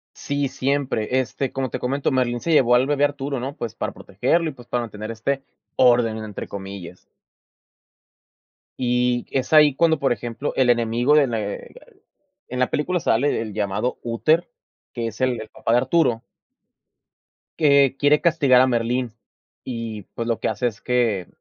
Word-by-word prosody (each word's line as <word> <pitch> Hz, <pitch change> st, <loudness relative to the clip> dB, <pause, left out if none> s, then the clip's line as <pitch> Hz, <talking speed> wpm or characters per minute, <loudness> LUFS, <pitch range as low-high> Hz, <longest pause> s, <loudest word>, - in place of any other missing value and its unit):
Sí, 140 Hz, -1 st, -2 dB
siempre. 130 Hz, -3 st, -1 dB
Este, 130 Hz, +1 st, -3 dB
como 135 Hz, -2 st, -3 dB
te -, -, -3 dB
comento, 135 Hz, +3 st, -1 dB
Merlín 125 Hz, -2 st, 0 dB
se 165 Hz, -, -1 dB
llevó 125 Hz, -5 st, +5 dB
al 125 Hz, +2 st, +4 dB
bebé 145 Hz, 0 st, +2 dB
Arturo, 140 Hz, -2 st, -2 dB
¿no?, 135 Hz, +3 st, -5 dB
pues, 115 Hz, -2 st, -5 dB
para -, -, -4 dB
protegerlo, 160 Hz, -, 0 dB
y, -, -, -10 dB
pues, 125 Hz, -3 st, -15 dB
para 120 Hz, -, -1 dB
mantener 110 Hz, -1 st, -7 dB
este 130 Hz, +5 st, -2 dB, 0.3 s
orden 120 Hz, -3 st, +4 dB
entre 110 Hz, -2 st, -7 dB
comillas. 95 Hz, -3 st, -8 dB, 1.8 s
Y 125 Hz, 0 st, +1 dB
es 135 Hz, +2 st, -2 dB
ahí 150 Hz, -3 st, +7 dB
cuando, 160 Hz, +1 st, +3 dB
por 135 Hz, -3 st, +1 dB
ejemplo, 120 Hz, +5 st, -4 dB
el 130 Hz, -2 st, +3 dB
enemigo 120 Hz, +4 st, +2 dB
de 145 Hz, -2 st, +5 dB
le 110 Hz, -4 st, -4 dB, 0.7 s
en 125 Hz, -, -6 dB
la 125 Hz, -, +1 dB
película 175 Hz, +4 st, 0 dB
sale 140 Hz, +1 st, +1 dB
el 110 Hz, -2 st, -5 dB
llamado 105 Hz, +3 st, -2 dB
Úter, 155 Hz, +9 st, +1 dB, 0.4 s
que 120 Hz, -3 st, -3 dB
es 110 Hz, +2 st, -8 dB
el 130 Hz, -2 st, +1 dB
el 110 Hz, -, -10 dB
papá 115 Hz, -, -2 dB
de -, -, +5 dB
Arturo 130 Hz, -3 st, +2 dB, 1.4 s
que 140 Hz, -3 st, +4 dB
quiere 145 Hz, +2 st, +4 dB
castigar 145 Hz, -7 st, +4 dB
a 130 Hz, -, +4 dB
Merlín. 120 Hz, 0 st, -1 dB, 0.5 s
Y, 115 Hz, -4 st, -5 dB
pues, 115 Hz, 0 st, -4 dB
lo 115 Hz, -, 0 dB
que -, -, 0 dB
hace 125 Hz, -, 0 dB
es 115 Hz, -1 st, -10 dB
que 115 Hz, -7 st, 0 dB
125 Hz, 170 wpm, -22 LUFS, 115-140 Hz, 1.8 s, ahí